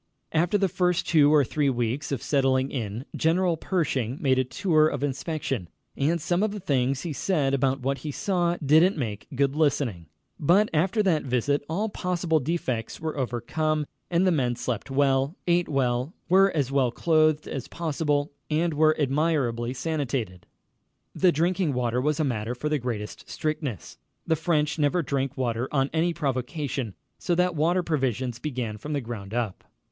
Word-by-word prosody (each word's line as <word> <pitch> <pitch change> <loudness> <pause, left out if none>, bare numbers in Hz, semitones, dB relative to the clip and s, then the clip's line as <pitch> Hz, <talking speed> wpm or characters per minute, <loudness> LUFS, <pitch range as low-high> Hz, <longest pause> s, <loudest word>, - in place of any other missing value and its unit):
After 175 +5 +2
the 195 -1 +2
first 180 -1 0
two 150 -3 +5
or 150 -2 +6
three 145 +2 0
weeks 120 +3 -2
of 135 -5 -2
settling 135 -2 +2
in, 115 -1 -4
General 170 +2 +2
Pershing 140 - -1
made 130 -3 +2
a - - +3
tour 155 +3 +2
of 145 -3 -3
inspection, 135 - -3 0.3
and 160 +5 +1
some 175 +4 0
of 215 - +2
the 210 +1 -5
things 135 -5 0
he 165 - -3
said 145 -2 0
about 135 0 +1
what 135 +2 -1
he 155 - -5
saw 175 +1 0
didn't 160 +6 +5
make 110 -7 -4
good 140 +1 +1
listening. 135 - 0 0.3
But 185 +8 +4
after 190 +7 +2
that 170 -6 +2
visit 135 +3 0
all 200 +7 0
possible 180 -5 0
defects 130 -6 -2
were 160 -1 -3
overcome, 150 +4 -1 0.2
and 175 +2 +2
the 185 - +4
men 125 -7 +1
slept 120 -1 -4
well, 135 +2 +2
ate 175 0 +2
well, 130 +2 0
were 190 +3 +5
as 135 -3 0
well 135 -3 +3
clothed 155 +2 +2
as 135 -3 -5
possible, 150 -3 -1 0.2
and 160 +2 +1
were 155 +1 +3
admirably 135 -5 +1
sanitated. 130 - -3 0.7
The 185 -2 +4
drinking 170 0 +1
water 125 0 0
was 150 +2 0
a - - +3
matter 120 -3 -2
for 150 +5 -3
the 150 -1 +1
greatest 115 -4 -5
strictness. 150 - -4 0.3
The 160 - +2
French 155 -1 0
never 150 +4 +2
drink 135 -1 -2
water 120 0 -1
on 135 -1 +1
any 165 +2 +2
provocation, 135 - -3 0.2
so 175 - 0
that 180 +1 +2
water 170 +4 +2
provisions 130 -6 -1
began 125 -7 -4
from 150 +7 -5
the 145 - -1
ground 110 -3 -6
up. 115 -6 -2
145 Hz, 170 wpm, -26 LUFS, 130-165 Hz, 0.7 s, or